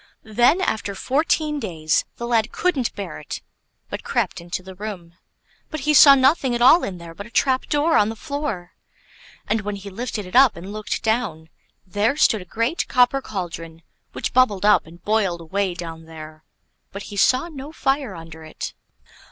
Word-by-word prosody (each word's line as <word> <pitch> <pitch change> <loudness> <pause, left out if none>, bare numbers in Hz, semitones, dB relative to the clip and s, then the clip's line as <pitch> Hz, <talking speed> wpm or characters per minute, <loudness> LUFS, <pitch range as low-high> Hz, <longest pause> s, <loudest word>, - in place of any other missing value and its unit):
Then 240 - +3
after 205 - -2
fourteen 300 +5 0
days 160 - 0
the 235 - -5
lad 230 -2 +1
couldn't 290 -10 0
bear 195 -6 -6
it, 150 - -7 0.4
but - - -6
crept 195 -7 -1
into 175 +2 -5
the 190 +1 -10
room, 185 -4 -7 0.6
but 310 - -5
he 300 +3 +2
saw 280 -1 +9
nothing 265 -1 +3
at 240 - -2
all 320 +8 +7
in 185 - -4
there 170 -1 -10
but 200 +5 -9
a - - -15
trap 260 +2 +1
door 300 +3 +2
on 210 - +4
the 225 - -5
floor; 280 - -4 0.8
and 220 - +1
when 205 +1 -4
he 200 0 -9
lifted 215 -1 -4
it 180 - -9
up 260 -3 +6
and 185 +4 -8
looked 215 0 -4
down, 220 -9 -1 0.4
there 205 +8 0
stood 220 -8 +3
a - - -10
great 230 - -1
copper 250 +2 +3
cauldron 165 -6 -6 0.3
which - - -3
bubbled 210 -6 +3
up 210 -6 +4
and 170 +2 -15
boiled 205 -5 +1
away 185 +2 -2
down 165 -2 -7
there; 155 -1 -11 0.5
but 200 +1 -7
he - - -6
saw 255 +9 +3
no 290 -3 -9
fire 270 -8 -1
under 165 -1 -11
it. 155 - -7
210 Hz, 185 wpm, -22 LUFS, 175-260 Hz, 0.8 s, saw